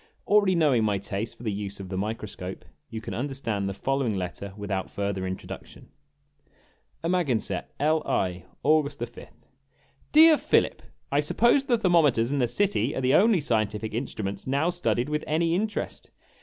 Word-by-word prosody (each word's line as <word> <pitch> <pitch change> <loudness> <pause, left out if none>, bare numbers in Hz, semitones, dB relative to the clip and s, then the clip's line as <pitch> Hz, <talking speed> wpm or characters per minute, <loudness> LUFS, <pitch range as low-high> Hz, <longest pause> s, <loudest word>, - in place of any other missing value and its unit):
Already 205 -3 +4
knowing 145 -9 +3
my 105 -2 +1
taste 100 +3 -4
for - - -12
the 110 - -1
use 100 0 -5
of 95 -1 -7
the 95 - -4
microscope, 100 -3 -5 0.2
you 110 - -5
can - - -6
understand 115 -6 -2
the - - -3
following 135 -2 0
letter 95 +2 -4
without 100 -2 -3
further 100 -2 -2
introduction: 95 0 -8 1.1
AMAGANSETT, 140 - 0
L. 155 +2 +2
I., 90 -1 -1 0.2
August 150 -1 +2
5th. 120 0 -9 0.7
DEAR 315 0 +7
PHILIP: - - +2 0.3
I - - +3
suppose 265 +3 +3
the 245 -3 +2
thermometers 150 - +3
in 145 - 0
the 125 - +2
city 145 - 0
are - - -2
the 130 +1 +2
only 210 -1 +5
scientific 110 -5 -1
in 120 +5 -1
struments 100 -3 -5
now 140 +6 +1
studied 175 -8 0
with 150 0 -2
any 165 +2 +1
interest. 210 +4 -3
120 Hz, 160 wpm, -26 LUFS, 100-160 Hz, 1.1 s, DEAR